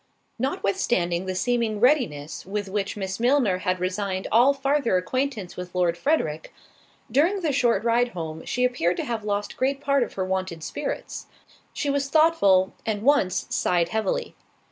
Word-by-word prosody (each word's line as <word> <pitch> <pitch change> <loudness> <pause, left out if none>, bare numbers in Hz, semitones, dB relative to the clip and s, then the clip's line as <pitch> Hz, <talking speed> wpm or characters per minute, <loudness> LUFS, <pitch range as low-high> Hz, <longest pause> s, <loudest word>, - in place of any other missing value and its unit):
Notwithstanding 190 -7 0
the 185 - -2
seeming 230 +1 0
readiness 215 - +1
with 205 +1 -4
which 200 +1 -2
Miss 190 0 -4
Milner 240 -6 +2
had 185 -1 -1
resigned 190 +1 -2
all 240 +5 +6
farther 275 -6 +1
acquaintance 225 0 -2
with 180 0 -8
Lord 175 -2 +2
Frederick, 170 - -1 0.6
during 350 +8 +2
the 320 -4 0
short 240 -6 +2
ride 235 +1 +3
home 160 -2 -6
she 250 - -1
appeared 180 -9 0
to - - -2
have 230 -4 -3
lost 205 0 -3
great 270 +1 0
part 280 -1 +1
of 240 - -2
her 190 - -2
wonted 185 -3 -3
spirits; - - -5 0.4
she 285 - -2
was 275 0 -1
thoughtful, 275 - +4
and 210 -2 -2
once 270 -9 +2
sighed 175 -1 +1
heavily. 445 - -2
210 Hz, 160 wpm, -25 LUFS, 185-275 Hz, 0.6 s, all